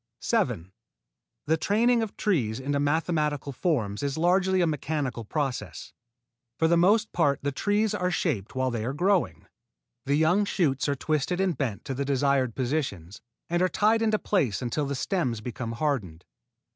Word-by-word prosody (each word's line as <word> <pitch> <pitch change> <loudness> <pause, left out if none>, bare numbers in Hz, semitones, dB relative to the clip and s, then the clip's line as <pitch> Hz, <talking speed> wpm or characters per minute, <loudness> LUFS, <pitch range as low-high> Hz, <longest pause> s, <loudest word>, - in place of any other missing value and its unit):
7. 85 +3 -1 0.7
The 160 +2 +2
training 230 +8 +2
of 220 -3 -5
trees 130 - 0
into 140 +2 -1
mathematical 150 -1 0
forms 125 - -1
is 140 0 -2
largely 185 +3 +2
a 175 - +4
mechanical 150 -5 -2
process. 115 - -4 0.6
For 160 - +3
the 170 - +4
most 210 +6 +3
part 145 -5 +2
the 145 - 0
trees 205 +8 0
are 180 -3 0
shaped 145 - -2
while 130 0 0
they 115 -2 -3
are 125 +4 -2
growing. 185 +3 +1 0.6
The 140 - +3
young 165 +7 +3
shoots 150 -9 0
are 140 - +1
twisted 155 +5 -1
and 190 -3 +1
bent 125 -7 -3
to 135 - -3
the 135 +2 -2
desired 135 -3 +1
positions, 120 - -3 0.3
and 175 +1 0
are 185 - +3
tied 220 +4 +2
into 215 -1 +2
place 145 - 0
until 135 +4 -2
the 140 - -2
stems 130 - -1
become 115 +1 -5
hardened. 115 - -2
145 Hz, 165 wpm, -27 LUFS, 130-180 Hz, 0.7 s, a